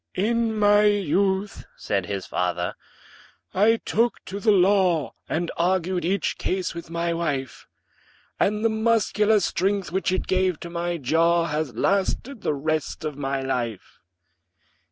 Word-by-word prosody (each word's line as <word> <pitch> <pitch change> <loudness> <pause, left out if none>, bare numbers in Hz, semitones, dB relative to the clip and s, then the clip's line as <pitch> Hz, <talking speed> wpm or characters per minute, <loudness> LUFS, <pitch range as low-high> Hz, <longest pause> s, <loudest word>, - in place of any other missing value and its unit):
"In 225 +2 0
my 205 0 +5
youth," 195 0 +1
said 100 -3 -2
his 100 -2 -4
fater, 90 -1 -2 0.8
"I 220 +4 +4
took 230 +2 +1
to 195 +2 -6
the 215 +1 +3
law, 185 -5 +3 0.2
And 170 +1 -1
argued 180 0 0
each 190 +4 -1
case 185 -1 -2
with 170 -1 -8
my 170 0 -1
wife; 145 -6 -3 0.7
And 210 +2 +1
the - - +5
muscular 220 -1 +2
strength, 195 0 -1
which 190 +1 0
it 185 - -1
gave 185 -3 +1
to 170 - -7
my 175 0 -2
jaw, 165 +4 +2
Has 150 -6 -3
lasted 200 - 0
the 150 - 0
rest 155 0 -2
of 150 -2 -3
my 135 -1 -2
life." 120 -6 -4
180 Hz, 140 wpm, -24 LUFS, 155-205 Hz, 0.8 s, my